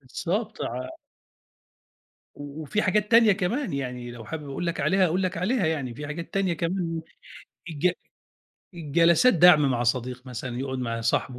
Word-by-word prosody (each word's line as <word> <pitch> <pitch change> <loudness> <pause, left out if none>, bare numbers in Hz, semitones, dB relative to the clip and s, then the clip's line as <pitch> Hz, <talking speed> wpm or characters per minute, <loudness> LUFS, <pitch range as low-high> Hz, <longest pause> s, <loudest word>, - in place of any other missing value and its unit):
بالضبط، 195 - -3
ع 125 +2 -4 1.5
و 145 +2 -8
وفي 210 +9 -1
حاجات 210 +3 +1
تانية 225 -2 +7
كمان 215 - -1
يعني 125 -3 -4
لو 115 -2 -10
حابب 150 +2 -6
أقول 135 +6 -4
لك 170 - -2
عليها 190 0 +3
أقول 180 +3 0
لك 185 -1 -2
عليها 200 +3 0
يعني 145 -6 -2
في 145 +1 -7
حاجات 165 +2 -7
تانية 195 -3 +1
كمان 170 0 -2 0.7
الج 160 +4 +1 0.8
الجلسات 170 - +3
دَعْم 155 -5 +6
مع 120 -1 0
صديق 125 +1 -2
مثلًا 125 0 -5
يقعد 130 -1 -3
مع 115 -2 -3
صاحبه 125 +2 -1
160 Hz, 160 wpm, -25 LUFS, 130-185 Hz, 1.5 s, تانية